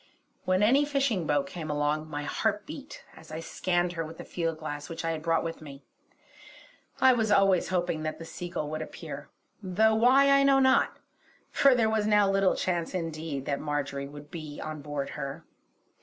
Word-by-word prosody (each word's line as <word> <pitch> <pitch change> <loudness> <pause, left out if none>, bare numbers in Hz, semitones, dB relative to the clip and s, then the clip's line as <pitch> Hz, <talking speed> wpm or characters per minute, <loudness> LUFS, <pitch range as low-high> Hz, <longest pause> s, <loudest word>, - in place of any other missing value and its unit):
When 185 +2 +2
any 265 +7 +5
fishing 275 - 0
boat 145 -1 +2
came 160 +1 -7
along, 150 +1 -1
my 145 -1 -4
heart 205 +7 -1
beat 295 -2 -9
as 155 - -14
I 155 - -4
scanned 175 +1 -1
her 165 -1 -3
with 160 +1 -9
the - - -7
field 165 -2 -2
glass 145 -2 -6
which 165 0 -5
I 165 - +1
had 160 -1 -4
brought 165 0 +1
with 165 0 -5
me. 140 -2 -11 1.2
I 260 -1 +6
was 220 -3 0
always 195 -3 +4
hoping 175 -3 -1
that 155 0 -3
the 165 - -9
Seagull 165 -2 -5
would 155 0 -3
appear, 150 -2 -8 0.3
though 210 +3 +3
why 260 +5 +5
I 275 0 +6
know 275 0 +5
not, 260 -1 +3 0.5
for 275 -2 +5
there 230 -2 +3
was 220 -1 +1
now 210 -1 +4
little 195 -1 +3
chance 175 0 -2
indeed 160 -5 -4
that 140 -1 -1
Marjory 140 -2 -3
would 145 +1 -12
be 155 -4 -7
on 155 -1 -6
board 145 -1 -4
her. 140 -2 -6
165 Hz, 190 wpm, -28 LUFS, 150-210 Hz, 1.2 s, I